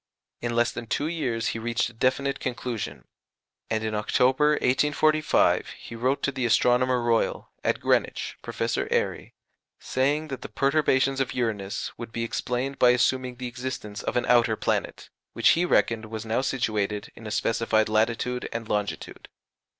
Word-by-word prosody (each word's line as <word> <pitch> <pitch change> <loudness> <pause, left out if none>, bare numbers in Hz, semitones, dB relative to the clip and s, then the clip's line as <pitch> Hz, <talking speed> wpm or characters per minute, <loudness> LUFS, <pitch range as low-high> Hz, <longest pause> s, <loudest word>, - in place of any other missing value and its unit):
In 120 0 -2
less 120 0 +3
than 120 -1 -7
two 125 +6 -1
years 135 -9 -1
he 115 - -3
reached 115 0 -1
a - - -21
definite 135 +4 0
conclusion; 115 - -4 0.6
and 110 0 -1
in 110 0 -2
October, 130 +7 +3
1845, 150 +3 +2
he 115 - -10
wrote 130 +4 0
to 140 - +1
the 130 -2 -3
Astronomer 125 +2 +3
Royal, 115 -1 0
at - - +1
Greenwich, - - 0
Professor - - -2
Airy, - - -1 0.4
saying 145 +4 0
that 135 - -5
the - - -7
perturbations 135 -1 +2
of 130 -1 -1
Uranus 105 -5 -2
would 115 -1 -7
be 115 0 -3
explained 125 +3 -2
by 125 - +6
assuming 125 +1 +2
the 125 +1 -7
existence 120 -4 -5
of - - -2
an 120 - +1
outer 120 -2 +4
planet, - - -2 0.2
which - - +4
he 175 +2 +4
reckoned 115 -9 +2
was 110 0 -6
now 110 +3 0
situated 105 -5 -1
in 115 - -10
a - - -4
specified 110 0 +1
latitude 115 +3 0
and 115 -1 -4
longitude. 105 -1 -3
120 Hz, 160 wpm, -26 LUFS, 110-130 Hz, 0.6 s, by